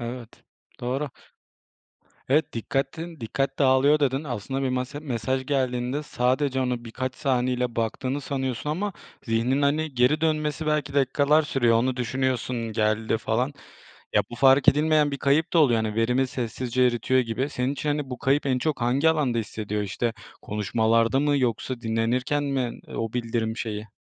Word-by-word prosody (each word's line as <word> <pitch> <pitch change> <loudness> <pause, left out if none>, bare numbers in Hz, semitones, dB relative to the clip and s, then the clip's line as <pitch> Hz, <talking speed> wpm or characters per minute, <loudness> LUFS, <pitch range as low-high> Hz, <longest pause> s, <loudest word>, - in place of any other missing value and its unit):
Evet, 120 -1 -8 0.4
doğru. 130 +4 -2 1.2
Evet, 150 +4 +2
"Dikkatin 160 +8 -3
dikkat 135 +4 -2
dağılıyor" 140 +2 +4
dedin. 135 0 +1
Aslında 135 0 -4
bir 135 - 0
mase 130 +3 -3
mesaj 130 -2 -2
geldiğinde 130 0 -1
sadece 130 0 0
onu 125 -2 -2
birkaç 130 +2 -4
saniyeliğine 125 -2 0
baktığını 130 +5 -2
sanıyorsun 130 0 -3
ama 195 +6 -2 0.3
zihnin, 120 +5 +1
hani, 150 +1 +1
geri 125 +5 +3
dönmesi 155 -1 0
belki 150 -2 0
dakikalar 140 +2 +3
sürüyor 130 -6 +2
onu 125 +2 +1
düşünüyorsun, 125 -2 -1
geldi, 110 +1 +1
falan. 120 +5 -1 0.6
Ya, - - +5
bu - - -6
fark 135 +1 +5
edilmeyen 150 0 +4
bir 140 - -3
kayıp 145 +5 +1
da 170 - +5
oluyor. 120 -7 +4
Hani, 105 -1 -3
verimi 125 +4 +2
sessizce 125 +1 -1
eritiyor 125 +1 +2
gibi 125 +4 -2
senin 125 0 -1
için, 150 +1 -3
hani, 145 -2 -2
bu 125 - -5
kayıp 140 +4 +1
en 130 -2 +1
çok 155 -2 -1
hangi 130 +7 +3
alanda 145 -7 +1
hissediyor, 105 -1 -3
işte, 110 +4 -2 0.3
konuşmalarda 115 +4 +1
mı 145 0 +2
yoksa 125 0 -1
dinlenirken 120 +5 0
mi, 135 -4 -2 0.2
o 115 -1 -3
bildirim 115 -2 -2
şeyi? 110 -2 -4
130 Hz, 155 wpm, -25 LUFS, 120-145 Hz, 1.2 s, Ya